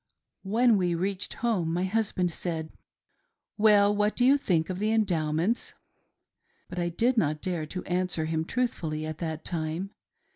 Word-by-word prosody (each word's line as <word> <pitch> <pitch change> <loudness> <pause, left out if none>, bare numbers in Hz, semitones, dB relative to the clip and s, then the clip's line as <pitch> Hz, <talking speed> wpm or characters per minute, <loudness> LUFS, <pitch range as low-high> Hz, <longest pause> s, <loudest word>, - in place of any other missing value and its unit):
When 225 +3 +3
we 175 -2 +1
reached 190 +3 -2
home, 185 -9 +1
my 175 +2 0
husband 190 -3 0
said: 160 -2 -4 0.4
" - - -51
Well, 205 -1 +5
what 210 +1 +1
do 245 - +2
you 270 +2 +6
think 180 - 0
of 185 - -4
the 215 +1 +1
Endowments?" 180 -1 0 0.9
But 180 - -5
I 175 0 0
did 235 +9 +1
not 155 -4 0
dare 170 -2 -3
to 180 +4 -5
answer 180 -3 0
him 160 0 -1
truthfully 160 -8 -2
at 155 0 -6
that 160 -2 -4
time. 165 +3 -3
180 Hz, 160 wpm, -28 LUFS, 160-210 Hz, 0.9 s, you